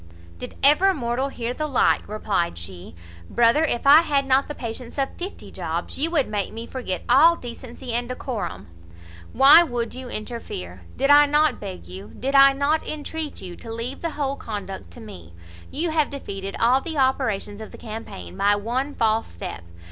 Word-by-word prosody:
"Did - - -8
ever 365 +8 +6
mortal 250 +1 -1
hear 240 -2 -4
the 305 +4 -3
like?" 275 - +2
replied 205 - -1
she. 85 -1 -9 0.3
"Brother, 240 +6 +3
if 280 -4 -1
I 290 +3 +9
had 280 -4 +1
not 270 +1 +3
the 295 - -6
patience 235 +2 -7
of 275 -1 -1
fifty 370 +3 -8
Jobs, - - -4
you 315 +3 +1
would 315 -5 +1
make 205 -2 -2
me 225 +1 -7
forget 235 -8 -4
all 300 +7 +6
decency 245 -1 -8
and 240 +1 -2
decorum. 235 -8 -5 0.7
Why 275 +5 +8
would 245 -8 -2
you 255 -1 -8
interfere? 95 - -6 0.2
Did 275 +1 +3
I 290 0 +8
not 295 -2 +2
beg 90 -2 -8
you, 95 +3 -10
did 270 +2 -2
I 275 0 +8
not 285 +3 +1
intreat 310 -2 -5
you, 180 -2 -7
to 230 - -9
leave 230 +4 -5
the 335 - -1
whole 280 -1 -1
conduct 195 -3 -7
to 240 - -12
me? 85 - -11 0.4
You 330 +2 -2
have 310 -2 +2
defeated 195 -8 -6
all 250 +3 +4
the 320 -1 -5
operations 240 -6 0
of 220 - -9
the - - -11
campaign 215 - -8
by 205 +1 +3
one 250 +7 -2
false 220 0 +1
step. 85 0 -7
245 Hz, 185 wpm, -23 LUFS, 215-280 Hz, 0.7 s, I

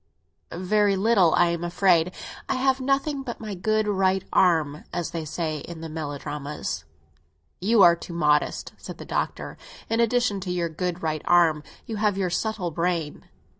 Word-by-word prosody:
Very 200 +3 +2
little, 195 -4 +4
I 175 0 +4
am 170 0 -2
afraid. 175 -1 +3 0.4
I - - +1
have 265 0 +1
nothing 275 +2 0
but 245 -3 -6
my 215 -2 -5
good 215 +3 0
right 190 -2 +1
arm, 160 -2 +2
as 175 - -3
they 165 -2 -4
say 155 0 -3
in 165 +3 -9
the 165 - -6
melodramas." 150 -1 -5 0.7
"You 210 +2 +4
are 170 -1 +7
too 170 0 -9
modest," 150 -3 +1
said - - -9
the - - -9
Doctor. - - -3 0.3
"In 225 - +1
addition 235 -3 +2
to 185 -1 -4
your 175 -2 -1
good 180 +2 -3
right 155 -1 -1
arm, 170 -3 +4 0.2
you 225 -3 -5
have 205 -2 +1
your 185 -3 -1
subtle 205 -2 -2
brain. 165 -2 -2
180 Hz, 170 wpm, -25 LUFS, 165-210 Hz, 0.7 s, are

